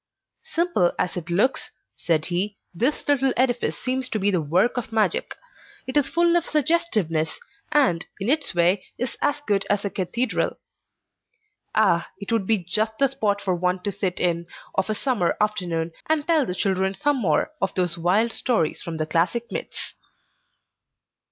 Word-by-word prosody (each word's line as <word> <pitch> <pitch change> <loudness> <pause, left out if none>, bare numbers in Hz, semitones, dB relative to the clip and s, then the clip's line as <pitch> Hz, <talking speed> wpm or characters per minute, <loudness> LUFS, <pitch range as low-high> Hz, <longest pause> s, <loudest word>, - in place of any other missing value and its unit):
"Simple 330 - +2
as 180 - -1
it 175 -1 -5
looks," 205 +10 +1 0.3
said 160 -3 +1
he, 195 +3 -1 0.2
"this 245 - 0
little 270 -2 +3
edifice 245 -1 +1
seems 260 0 -2
to - - -1
be 205 0 +2
the 180 -4 +1
work 175 +10 +2
of 235 -2 -4
magic. 225 - 0 0.5
It 260 - -5
is 290 -2 +4
full 340 0 +3
of 345 - +3
suggestiveness, 250 - +1 0.3
and, 180 - +3 0.2
in 195 - -3
its 285 - +1
way, 175 +3 +3
is 250 - -3
as 290 0 +1
good 200 -2 +1
as 205 0 +1
a 200 - -1
cathedral. 220 +7 -1 1.2
Ah, 195 -6 +3
it 200 - -6
would 220 -5 +1
be 215 -5 +2
just 215 +5 -1
the 275 -1 +3
spot 210 -6 0
for 185 - 0
one 180 +1 0
to 205 - -1
sit 190 -2 -2
in, 170 -1 0 0.3
of 190 +2 0
a 215 - +1
summer 230 -8 0
afternoon, 180 -6 0 0.2
and 310 -2 +2
tell 315 -6 +3
the 180 - -3
children 190 0 +1
some 290 +8 +1
more 190 - +1
of - - -1
those 180 -2 +1
wild 190 +7 +2
stories 195 -11 0
from 165 -1 -5
the 155 - -1
classic 175 +9 0
myths!" - - -5
205 Hz, 170 wpm, -24 LUFS, 180-255 Hz, 1.2 s, is